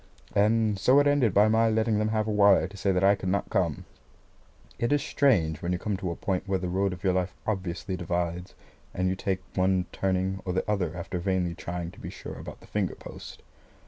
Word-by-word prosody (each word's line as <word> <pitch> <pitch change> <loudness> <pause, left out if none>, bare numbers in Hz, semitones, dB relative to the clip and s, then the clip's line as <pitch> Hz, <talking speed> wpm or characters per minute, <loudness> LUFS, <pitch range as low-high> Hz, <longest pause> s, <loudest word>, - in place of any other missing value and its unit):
And 105 0 +2
so 130 +8 +5
it 145 - +4
ended 145 -6 +3
by 105 +3 +5
my 110 +1 +3
letting 110 -1 +1
them 105 - +1
have 110 0 0
a - - 0
wire 100 -2 +5
to 100 - -13
say 100 0 0
that 90 0 +1
I 100 +1 +6
could 95 -2 -3
not 100 +1 -1
come. - - 0 0.9
It 120 - 0
is 145 -1 +2
strange 85 - +2
when 85 - -2
you - - 0
come 105 +2 -2
to 95 - -3
a 85 - -3
point 95 0 -2
where 95 0 +1
the 90 -1 -3
road 95 +2 +1
of 90 0 -8
your 95 -2 +2
life 90 -1 -1
obviously 95 -2 -3
divides, 85 +1 -3 0.4
and 90 0 0
you 95 - 0
take 95 0 -2
one 95 -1 +2
turning 95 0 -1
or 90 - -2
the 95 - -1
other 90 -5 -1
after 90 +1 -4
vainly 90 -1 0
trying 85 -1 -5
to - - -16
be - - -7
sure - - -8
about - - -9
the - - -15
finger - - -2
post. - - -11
95 Hz, 230 wpm, -27 LUFS, 90-105 Hz, 0.9 s, I